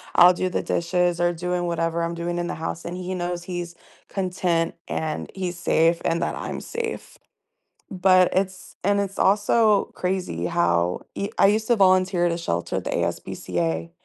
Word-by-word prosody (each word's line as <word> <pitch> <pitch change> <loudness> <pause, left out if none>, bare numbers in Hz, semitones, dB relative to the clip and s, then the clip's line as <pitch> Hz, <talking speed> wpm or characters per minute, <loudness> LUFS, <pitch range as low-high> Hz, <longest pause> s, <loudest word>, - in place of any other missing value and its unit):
I'll 180 +1 +9
do 185 +1 -1
the - - -1
dishes 175 0 0
or 175 0 +2
doing 175 +1 -2
whatever 170 0 -1
I'm 170 0 -2
doing 175 +1 -3
in 175 - -1
the - - -3
house, 165 +1 -5
and 175 - -4
he 185 +1 -4
knows 175 -1 -3
he's 175 -1 -5 0.4
content 180 -3 -1
and 155 -1 -3
he's 180 -2 -3
safe 165 0 +2
and 170 +1 +1
that - - -1
I'm - - -5
safe. 465 -1 -5 0.7
But 185 -1 +4
it's 190 -1 -2
and 200 +1 +3
it's 195 -1 -4
also 210 +1 +3
crazy 185 0 -2
how 90 - +1
e 200 +2 -3
I - - +7
used 215 +2 +1
to 240 - +4
volunteer 185 -2 +4
at 170 - +1
a 170 - -2
shelter 85 - -2
at - - -3
the - - -2
ASPCA, 85 -2 -2
175 Hz, 180 wpm, -24 LUFS, 170-190 Hz, 0.7 s, I'll